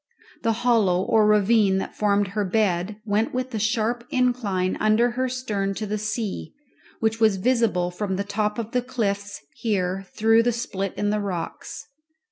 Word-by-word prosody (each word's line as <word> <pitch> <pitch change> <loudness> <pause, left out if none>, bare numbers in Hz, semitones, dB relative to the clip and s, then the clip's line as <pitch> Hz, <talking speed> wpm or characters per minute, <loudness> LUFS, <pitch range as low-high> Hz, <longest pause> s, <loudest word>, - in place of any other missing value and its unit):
The 225 -2 +1
hollow 200 -7 +3
or 215 +1 +3
ravine 210 -1 +4
that 190 - -4
formed 205 -1 +1
her 205 +1 -1
bed 195 -1 0
went 215 +3 0
with 255 0 -3
a 220 - -1
sharp 225 +2 0
incline 230 -8 0
under 215 +3 +3
her 255 +2 -1
stern 210 -6 -2
to 215 - -3
the 210 +1 -2
sea, 215 +2 -4 0.5
which 225 0 +1
was 220 -3 +4
visible 200 -5 +1
from 190 +1 -3
the 200 - -1
top 210 +1 -1
of 230 -1 -4
the 250 - +1
cliffs 205 -7 -3 0.2
here 195 -3 -1
through 225 +1 +4
the 240 +1 +2
split 195 -4 -3
in 205 0 0
the 210 - 0
rocks. 185 -5 -5
210 Hz, 170 wpm, -24 LUFS, 195-230 Hz, 0.5 s, ravine